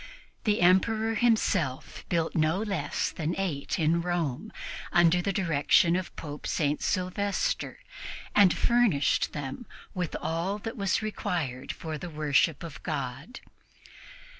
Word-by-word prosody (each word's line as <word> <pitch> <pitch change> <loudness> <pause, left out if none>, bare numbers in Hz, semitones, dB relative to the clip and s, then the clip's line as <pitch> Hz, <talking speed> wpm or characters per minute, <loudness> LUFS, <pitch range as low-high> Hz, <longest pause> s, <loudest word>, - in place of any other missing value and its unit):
The 210 -3 +2
Emperor 215 +5 +3
himself 205 - 0
built 165 -2 0
no 155 +2 +2
less 195 -8 -1
than 160 +1 -2
eight 170 -8 -2
in 165 0 +2
Rome, 175 - -2 0.4
under 175 +1 +5
the 200 - 0
direction 170 -2 +3
of 185 -1 -3
Pope 150 -1 -7
St. 150 -1 0
Sylvester, 200 - -1 0.6
and 200 -3 +7
furnished 235 -12 +2
them 145 - -5 0.3
with 180 -4 -3
all 170 +5 -1
that 225 +3 -6
was 200 -1 0
required 170 - -3
for 155 -2 -6
the 175 - -6
worship 150 0 +1
of 160 -4 -8
God. 150 - -5
175 Hz, 125 wpm, -28 LUFS, 155-200 Hz, 0.6 s, and